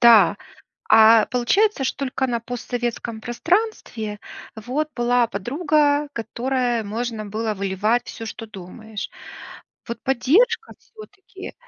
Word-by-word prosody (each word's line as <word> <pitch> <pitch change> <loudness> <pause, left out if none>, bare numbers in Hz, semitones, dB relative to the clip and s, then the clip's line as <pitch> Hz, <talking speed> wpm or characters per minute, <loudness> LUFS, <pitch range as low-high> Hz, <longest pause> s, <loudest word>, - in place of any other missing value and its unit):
Да. 225 -4 +7 0.5
А 220 0 +7
получается, 270 - +2
что 265 - -2
только 265 -1 -1
на 235 -2 -1
постсоветском 240 -2 -4
пространстве 240 - -1 0.4
вот 260 +8 -2
была 240 0 +3
подруга, 290 - +1
которая- 240 +1 -1
можно 220 +1 -4
было 215 +2 -2
выливать 205 +4 0
всё, 225 - -7
что 225 +1 -7
думаешь. 215 +1 -8 0.8
Вот 235 - -5
поддержка 395 - +2
всё-таки 405 -3 -12
240 Hz, 110 wpm, -22 LUFS, 220-280 Hz, 0.8 s, Да